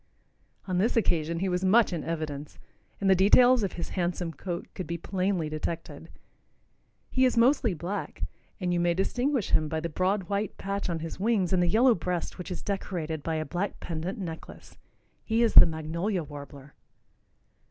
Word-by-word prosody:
On 180 -1 0
this 225 +5 +1
occasion 165 -5 +1
he 195 - +1
was 180 0 -1
much 200 +1 +4
in 165 - -3
evidence, 150 -3 -5 0.4
and 200 - 0
the 190 - +7
details 245 +6 +6
of 195 -3 -2
his 170 - -5
handsome 175 -2 -2
coat 175 +3 -5
could 185 - -6
be 170 - -3
plainly 185 -1 -1
detected. 155 +2 -5 1.0
He 260 - +2
is 250 -2 +3
mostly 235 -4 +3
black, 175 +6 -5 0.4
and 180 -2 -1
you 175 - +1
may 175 0 +2
distinguish 245 +5 0
him 155 - +3
by 160 - -1
the 170 +2 -3
broad 185 +5 0
white 200 +3 -3
patch 200 -1 -3
on 165 -2 -2
his 165 +2 -6
wings 200 -4 +1
and 180 - +3
the 175 - +2
yellow 235 +7 +5
breast 180 -1 -3
which 180 - -6
is 180 - -5
decorated 170 -6 -3
by 160 +2 -2
a 155 0 -2
black 180 +5 -3
pendant 170 +3 -4
necklace. 165 -5 -8 0.5
He 225 +1 +1
is 230 - +2
the - - +10
magnolia 165 +4 -2
warbler. 145 -1 -11
180 Hz, 180 wpm, -28 LUFS, 165-200 Hz, 1.0 s, the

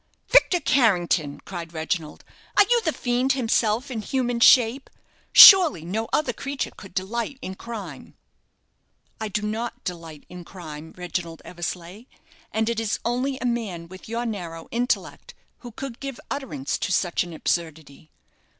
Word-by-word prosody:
"Victor 390 -7 +5
Carrington!" 175 - +1
cried 170 -3 -8
Reginald, 160 -1 -4 0.3
"are - - +9
you 480 +1 +3
the 325 - 0
fiend 250 0 0
himself 235 0 0
in 225 -3 -3
human 245 0 -1
shape? 245 +2 +5 0.4
Surely 340 - +9
no 220 +6 -3
other 280 -5 0
creature 275 +3 -4
could 195 -3 -13
delight 235 +7 -3
in 190 - -5
crime." 195 - -9 1.0
"I 220 - -3
do 210 +1 -3
not 225 +3 -4
delight 165 -4 -7
in 180 0 -10
crime, 160 -3 -10
Reginald 175 -2 -5
Eversleigh; 180 +4 -6 0.5
and 220 0 0
it 235 -1 -1
is 225 -2 -1
only 255 +3 -1
a 255 - -5
man 205 -9 -3
with 185 +3 -12
your 235 +1 -2
narrow 170 -7 -6
intellect 245 +2 -2 0.2
who 245 - -9
could 265 0 -8
give 275 -3 -6
utterance 150 - -3
to - - -2
such 175 -1 +1
an 175 - -9
absurdity. 160 -2 -4
215 Hz, 150 wpm, -24 LUFS, 170-245 Hz, 1.0 s, are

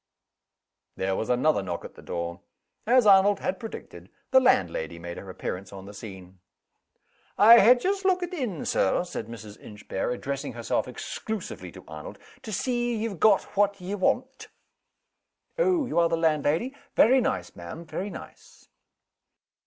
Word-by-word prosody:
There 95 0 -1
was 110 - -3
another 125 0 +2
knock 90 -3 -5
at - - -10
the - - -14
door. 85 +1 -5 0.5
As 250 0 +5
Arnold 200 0 +6
had 275 - -2
predicted, 225 -2 -9 0.2
the 260 - +7
landlady 85 - +1
made 85 +1 -7
her 95 - -9
appearance 95 +1 -5
on 95 -1 -9
the 100 - -10
scene. 95 -3 -10 1.0
"I 230 +3 +9
ha' 245 +5 +7
just 390 +7 -1
lookit 365 -1 +1
in, 240 - -3
Sir," 95 - +1
said 145 -11 -6
Mrs. 110 -3 -10
Inchbare, 105 -2 -5
addressing 140 +3 -4
herself 120 0 -1
exclusively 220 -2 -6
to - - -13
Arnold, - - -9 0.2
"to 220 - -8
see 240 +1 -1
ye've 215 -5 -3
got 205 +3 +5
what 200 0 +2
ye 185 +2 -5
want." 255 +7 -1 1.1
"Oh! 365 - +3
you 210 - 0
are 170 -1 +4
the 165 - +1
landlady? 160 - +1 0.2
Very 260 +4 +6
nice, - - -2
ma'am 85 - -8
very 185 +5 -4
nice." - - -12
180 Hz, 155 wpm, -26 LUFS, -, 1.1 s, I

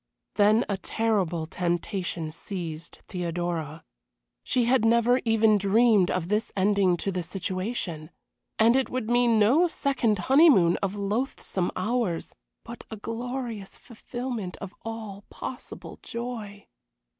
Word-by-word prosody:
Then 215 +3 +4
a 200 - -1
terrible 190 -6 0
temptation 175 -1 -2
seized 165 -2 -7
Theodora. 170 -3 -3 0.6
She 245 -2 +1
had 250 -1 +3
never 235 +2 +4
even 220 -2 +4
dreamed 205 -1 +4
of 180 -2 -1
this 210 +3 -1
ending 195 -2 +3
to 195 - -2
the 180 -1 -2
situation; 185 -2 -4 0.5
and 230 +2 +5
it 265 -1 +1
would 245 -3 -3
mean 240 -2 +4
no 260 +12 +5
second 250 -9 0
honeymoon 245 - +5
of 195 0 -2
loathsome 200 -2 -1
hours, 190 -3 -1 0.3
but 235 0 -9
a 220 - -6
glorious 230 -2 -5
fulfilment 240 -4 -6
of 195 0 -8
all 220 -3 -6
possible - - -8
joy. 225 -4 -6
210 Hz, 120 wpm, -26 LUFS, 180-235 Hz, 0.6 s, and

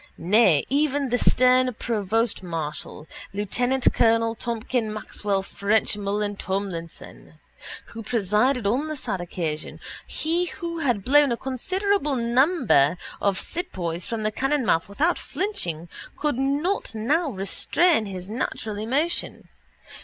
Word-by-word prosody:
Nay, 185 -4 +4
even 285 0 +1
the 245 +1 +1
stern 255 0 +4
provostmarshal, 190 -10 -2 0.3
lieutenantcolonel 230 +1 +2
Tomkin 235 -1 -2
Maxwell 205 -2 -2
ffrenchmullan 205 0 0
Tomlinson, 190 -4 -5 0.6
who 230 - -6
presided 220 +3 +1
on 255 +9 +1
the 310 -1 -4
sad 190 -8 -3
occasion, 165 -3 -4 0.3
he 335 +3 0
who 335 -1 -5
had 245 -10 0
blown 285 0 +5
a 235 - 0
considerable 330 - 0
number 235 - +3 0.2
of 200 -2 +1
sepoys 175 - -3
from 225 -2 -3
the 215 - +1
cannonmouth 260 - +1
without 315 +13 +1
flinching, 175 - -3 0.3
could 295 -4 -1
not 285 - 0
now 290 +9 +1
restrain 220 - +1
his 185 -2 -7
natural 215 -1 -3
emotion. 280 +10 -2
230 Hz, 110 wpm, -24 LUFS, 200-280 Hz, 0.6 s, blown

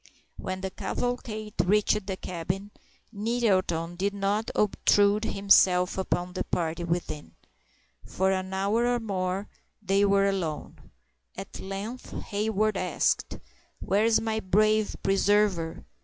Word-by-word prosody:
When 185 0 -4
the 190 0 -3
cavalcade 215 -2 -3
reached 210 +1 +2
the 190 -2 -3
cabin, 185 +4 -4 0.4
Nettleton 200 -7 0
did 200 +2 -1
not 200 +3 0
obtrude 205 +1 +3
himself 185 -2 +4
upon 180 -1 -2
the 185 - -2
party 170 0 -2
within. 170 -3 -4 0.7
For 190 +1 0
an 190 0 -2
hour 200 +5 +1
or 245 0 +1
more 195 -2 -2 0.3
they 200 -1 +2
were 200 0 +4
alone. 185 -6 -3 0.5
At - - -8
length 200 +6 -6
Hayward 215 0 0
asked: 180 - 0 0.4
"Where 205 +3 +1
is 230 -1 +4
my 220 -1 -1
brave 215 +2 +2
preserver? 195 -4 +1
195 Hz, 120 wpm, -27 LUFS, 185-215 Hz, 0.7 s, himself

